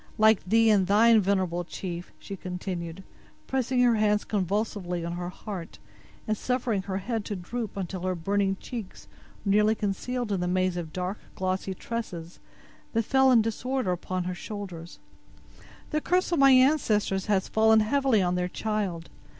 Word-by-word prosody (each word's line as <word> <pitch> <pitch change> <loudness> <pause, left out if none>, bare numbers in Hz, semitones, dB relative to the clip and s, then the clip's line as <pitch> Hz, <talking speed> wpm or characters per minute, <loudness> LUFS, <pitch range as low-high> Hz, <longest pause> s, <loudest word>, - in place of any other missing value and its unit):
Like 220 -1 +5
thee 225 +4 +4
and 195 -3 +3
thine, 220 +2 +6
venerable 185 -3 0
chief," 175 0 -6
she 200 - -8
continued, 180 -1 -5 0.4
pressing 255 -1 +1
her 240 -2 +4
hands 210 -1 +2
convulsively 195 -3 -2
on 170 - -3
her 175 0 -4
heart, 185 -2 -7 0.5
and 215 - +1
suffering 245 -3 -1
her 190 0 -3
head 225 +2 -2
to 205 - -3
droop 210 +4 -5
until 185 -1 -4
her 185 0 -1
burning 195 +3 0
cheeks 225 -6 -8 0.4
were 200 - +2
nearly 210 +2 +4
concealed 220 +3 -2
in 195 - 0
the 180 - -1
maze 185 0 +1
of 170 -3 -5
dark, 185 +4 -3 0.2
glossy 190 0 -2
tresses 180 -7 -6 0.5
that 230 0 +2
fell 265 +1 +4
in 230 -3 +6
disorder 240 -1 -1
upon 180 +1 -2
her 180 +1 -3
shoulders, 180 -4 -7 0.9
"the 305 - 0
curse 360 +2 +1
of 340 - +2
my 275 0 +7
ancestors 255 -8 +3
has 195 -3 +1
fallen 220 0 +4
heavily 250 -2 +2
on 180 0 +1
their 180 0 -1
child. 200 -6 -2
200 Hz, 165 wpm, -27 LUFS, 180-225 Hz, 0.9 s, my